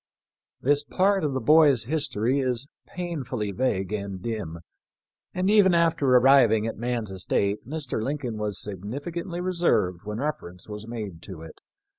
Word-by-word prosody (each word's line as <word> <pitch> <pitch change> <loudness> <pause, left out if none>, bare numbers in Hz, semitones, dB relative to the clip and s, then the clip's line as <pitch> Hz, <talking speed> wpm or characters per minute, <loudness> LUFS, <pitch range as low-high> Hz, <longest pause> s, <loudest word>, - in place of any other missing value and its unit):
This 145 +2 +2
part 195 +3 +1
of 145 -3 0
the 130 - 0
boy's 145 -1 +5
history 135 -2 0
is 130 0 -1 0.2
painfully 135 - -4
vague 100 -4 -1
and 100 -2 -4
dim, 105 -6 -4 0.7
and 185 +1 -1
even 200 -4 +5
after 165 -4 +2
arriving 125 -4 +5
at 115 - -3
man's 120 -3 -3
estate 100 +2 -1
Mr. 145 -6 -3
Lincoln 130 -2 -3
was 105 -1 -2
significantly 145 - -5
reserved 170 - +1
when 105 0 -4
refer 150 -6 -3
ence 90 0 -14
was 105 +1 -7
made 105 -8 -6
to 90 -5 -9
it. 80 -1 -12
125 Hz, 150 wpm, -26 LUFS, 105-150 Hz, 0.7 s, boy's